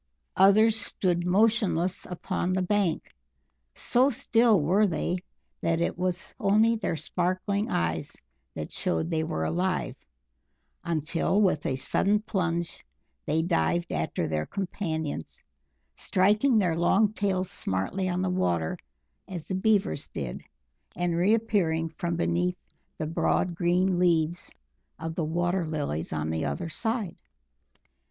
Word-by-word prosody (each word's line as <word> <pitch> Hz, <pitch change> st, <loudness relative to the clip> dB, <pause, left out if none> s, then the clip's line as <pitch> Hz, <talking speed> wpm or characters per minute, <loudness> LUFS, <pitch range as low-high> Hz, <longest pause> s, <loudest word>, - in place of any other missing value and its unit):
Others 215 Hz, +4 st, +6 dB
stood 175 Hz, -3 st, -1 dB
motionless 195 Hz, -3 st, +2 dB
upon 180 Hz, +1 st, -2 dB
the 185 Hz, 0 st, +1 dB
bank; 190 Hz, -3 st, 0 dB, 0.6 s
so 255 Hz, +3 st, +3 dB
still 230 Hz, -4 st, +3 dB
were 190 Hz, +8 st, +3 dB
they 180 Hz, 0 st, -1 dB, 0.4 s
that 165 Hz, 0 st, +1 dB
it 170 Hz, -, 0 dB
was 180 Hz, 0 st, -2 dB
only 215 Hz, +3 st, +4 dB
their 210 Hz, -6 st, -2 dB
sparkling 185 Hz, +6 st, -1 dB
eyes 80 Hz, -2 st, -1 dB, 0.4 s
that -, -, -5 dB
showed 85 Hz, -, -1 dB
they 160 Hz, -1 st, +1 dB
were 80 Hz, -, -2 dB
alive, 180 Hz, -, -1 dB, 0.9 s
until 165 Hz, +4 st, 0 dB
with 185 Hz, -8 st, +2 dB
a 130 Hz, -, 0 dB
sudden 195 Hz, +10 st, +1 dB
plunge, 175 Hz, -5 st, -2 dB, 0.4 s
they 160 Hz, +2 st, +1 dB
dived 175 Hz, 0 st, 0 dB
after 145 Hz, -, -1 dB
their 75 Hz, -1 st, -2 dB
companions, 160 Hz, -, -4 dB, 0.5 s
striking 210 Hz, +7 st, +3 dB
their 180 Hz, -6 st, +2 dB
long 200 Hz, +5 st, +3 dB
tails 190 Hz, -3 st, -1 dB
smartly 185 Hz, -, -2 dB
on 180 Hz, +1 st, -1 dB
the 185 Hz, -, 0 dB
water 85 Hz, -, 0 dB, 0.5 s
as 175 Hz, -4 st, -6 dB
the -, -, -4 dB
Beavers 200 Hz, -5 st, +1 dB
did, 65 Hz, -5 st, -5 dB, 0.5 s
and 175 Hz, -1 st, 0 dB
reappearing 180 Hz, -4 st, +2 dB
from 170 Hz, +2 st, -3 dB
beneath 175 Hz, +2 st, 0 dB, 0.4 s
the 155 Hz, -, -2 dB
broad 165 Hz, +3 st, 0 dB
green 180 Hz, +2 st, +1 dB
leaves 170 Hz, -1 st, +1 dB, 0.5 s
of 165 Hz, 0 st, -4 dB
the 165 Hz, -, -2 dB
water 175 Hz, +3 st, 0 dB
lilies 145 Hz, -, -3 dB
on 80 Hz, 0 st, -2 dB
the 80 Hz, 0 st, -1 dB
other 70 Hz, -, -3 dB
side. 220 Hz, +1 st, -2 dB
175 Hz, 130 wpm, -27 LUFS, 160-195 Hz, 0.9 s, Others